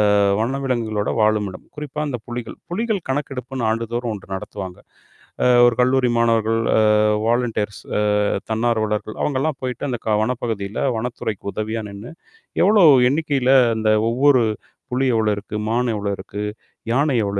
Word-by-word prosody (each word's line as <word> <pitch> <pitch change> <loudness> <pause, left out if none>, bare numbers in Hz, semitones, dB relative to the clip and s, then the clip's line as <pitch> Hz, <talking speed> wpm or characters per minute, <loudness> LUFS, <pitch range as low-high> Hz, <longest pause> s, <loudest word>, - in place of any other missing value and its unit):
அ 100 - +4 0.2
வனவிலங்குகளோட 120 -4 -1
வாழுமிடம். 105 -3 0
குறிப்பா 150 -1 -6
அந்த 125 -3 -3
புலிகள். 120 -1 -6
புலிகள் 215 0 -1
கணக்கெடுப்புன்னு 130 -3 -3
ஆண்டுதோறும் 115 +1 -2
ஒன்று 95 -2 -8
நடத்துவாங்க. 95 -2 -7 0.6
அ - - +4 0.2
ஒரு 120 -1 +1
கல்லூரி 125 -1 +3
மாணவர்கள், 115 -1 +2 0.2
அ - - +5 0.5
வாலின்டியர்ஸ் 115 -4 -1 0.2
அ - - +1 0.5
தன்னார்வலர்கள் 110 -2 -1
அவுங்கள்லாம் 145 +1 -1
போயிட்டு 130 +2 -3
அந்த 120 -2 -3
க 105 -1 +3
வனப்பகுதியில 110 -4 -3 0.2
வனத்துறைக்கு 110 -4 -4
உதவியா 110 +1 -3
நின்னு, 100 +4 -9 0.5
எவ்ளோ 205 -2 +5 0.3
எண்ணிக்கையில 140 -3 +1 0.2
அந்த 110 -1 +1 0.2
ஒவ்வொரு 130 +1 +4 0.5
புலி 130 +2 +1
எவ்ளோ 110 -1 +2
இருக்கு, 100 +1 -7
மான் 120 +3 +1
எவ்ளோ 100 -1 -2
இருக்கு, 105 - -7 0.5
யானை 140 +2 +2
எவ்வளோ 100 0 -2
115 Hz, 135 wpm, -21 LUFS, 110-130 Hz, 0.6 s, அ